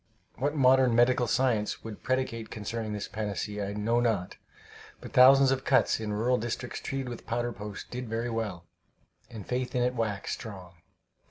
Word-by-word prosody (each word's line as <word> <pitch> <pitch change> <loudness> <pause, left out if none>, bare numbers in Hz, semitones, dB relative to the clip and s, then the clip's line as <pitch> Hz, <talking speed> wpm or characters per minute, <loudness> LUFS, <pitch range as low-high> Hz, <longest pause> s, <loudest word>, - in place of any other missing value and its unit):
What 145 +3 0
modern 130 -3 +5
medical 120 +1 +4
science 115 -3 0
would 110 -2 -8
predicate 130 -3 -2
concerning 110 0 -4
this 105 -1 -4
panacea, 105 -1 -3
I - - -4
know 110 +3 +1
not, 110 -7 0 0.6
but - - -10
thousands 135 +1 +7
of 135 0 0
cuts 130 - +3
in 110 -1 -3
rural 120 +4 +1
districts 120 +2 -4
treated 135 -1 -4
with 120 -2 -8
powder 120 +1 -1
post 105 -1 -8
did 125 -1 -5
very 115 +2 -2
well, 105 -7 -3 0.6
and 110 -5 -9
faith 125 0 -2
in 125 - +2
it 125 +1 +1
waxed 110 -5 -2
strong. 95 -6 -8
115 Hz, 170 wpm, -29 LUFS, 105-125 Hz, 0.6 s, thousands